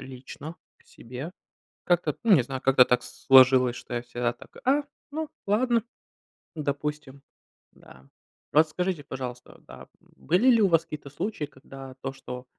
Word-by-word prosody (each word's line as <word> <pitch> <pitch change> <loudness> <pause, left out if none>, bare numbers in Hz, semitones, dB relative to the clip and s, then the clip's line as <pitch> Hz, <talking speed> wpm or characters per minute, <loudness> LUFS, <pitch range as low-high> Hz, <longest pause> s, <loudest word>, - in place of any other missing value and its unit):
лично 135 +5 -9 0.2
к - - -29
себе. 130 +8 -8 0.5
Как-то 175 -4 +1
ну 225 -3 +4
не 135 - +4
знаю, 130 +1 -6
как-то 135 -1 +6
так 125 0 +1
сложилось, 130 -1 +5
что - - -8
я 120 - -2
всегда 120 0 -2
так: - - -17
"А, 280 +3 +3 0.3
ну 310 +1 -4 0.2
ладно, 230 +2 +2 0.7
допустим". 145 -2 -4 0.5
Да. 65 +1 -18 0.5
Расскажите, 160 +2 +2
пожалуйста, 125 -2 -7
да, - - -12
были 180 - 0
ли 230 -3 +5
у 195 - +5
вас 165 -1 +3
какие-то 150 -4 -8
случаи, 175 +2 -3
когда 135 -1 -12
то, 135 0 -3
что 125 -2 -8
140 Hz, 150 wpm, -26 LUFS, 130-175 Hz, 0.7 s, как-то